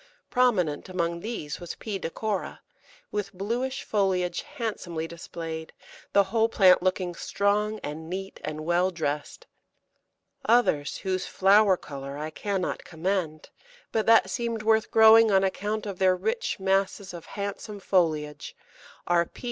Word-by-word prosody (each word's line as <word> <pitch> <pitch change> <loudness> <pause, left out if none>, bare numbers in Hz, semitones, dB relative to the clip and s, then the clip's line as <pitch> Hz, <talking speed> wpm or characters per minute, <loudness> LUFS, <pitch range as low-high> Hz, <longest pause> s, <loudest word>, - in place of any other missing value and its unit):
Prominent 190 -13 +1
among 170 -2 -1
these 170 -8 -5
was 175 -1 -7
P. 205 -3 -5
decora, 200 +4 -3 0.5
with 205 -1 -3
bluish 235 +8 -2
foliage 185 -4 0
handsomely 175 -8 -4
displayed, 165 -1 -7 0.4
the 200 - +5
whole 225 +3 +1
plant 185 -5 +5
looking 185 -1 0
strong 210 +4 0
and 160 +2 -6
neat 195 +2 -5
and 155 0 -5
well 175 +2 +2
dressed. 150 -4 -4 1.0
Others 225 -12 +2
whose 185 -1 -2
flower 195 0 +4
colour 140 -2 -8
I 155 +1 -4
cannot 195 +2 -2
commend, 165 -2 -3 0.4
but 220 -1 0
that 225 0 +5
seemed 235 -3 -2
worth 220 0 +3
growing 220 0 +7
on 195 -1 +4
account 210 +3 -2
of 195 -3 -6
their 185 -1 +4
rich 465 - -2
masses 195 0 0
of 170 -2 -9
handsome 200 +1 -5
foliage, 155 -6 0 0.5
are 170 -1 +2
_P. - - -17
190 Hz, 135 wpm, -27 LUFS, 170-210 Hz, 1.0 s, growing